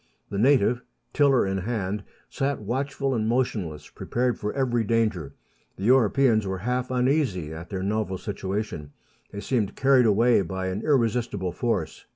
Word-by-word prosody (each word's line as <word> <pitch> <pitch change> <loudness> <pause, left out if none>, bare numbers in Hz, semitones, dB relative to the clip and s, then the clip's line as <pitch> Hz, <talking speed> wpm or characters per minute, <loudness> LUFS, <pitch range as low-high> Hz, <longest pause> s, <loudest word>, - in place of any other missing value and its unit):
The 100 - -2
native, 125 -1 +3 0.3
tiller 140 -6 +4
in 95 0 -1
hand, 105 -1 -3 0.2
sat 140 0 -2
watchful 135 +5 -2
and 110 -3 0
motionless, 105 - -1
prepared 125 -1 -1
for 105 - -2
every 120 -4 0
danger. 110 -9 0 0.4
The 95 - -7
Europeans 115 -2 +3
were 95 0 -2
half 125 +5 -2
uneasy 125 - 0
at 80 +2 -9
their 95 -2 -3
novel 100 -1 -1
situation; 95 -7 -4 0.4
they 100 - -7
seemed 110 -6 -1
carried 130 -3 +4
away 115 +2 +4
by 95 +1 -3
an 95 +3 -3
irresistible 115 - 0
force. 100 -3 -3
110 Hz, 150 wpm, -25 LUFS, 95-125 Hz, 0.4 s, tiller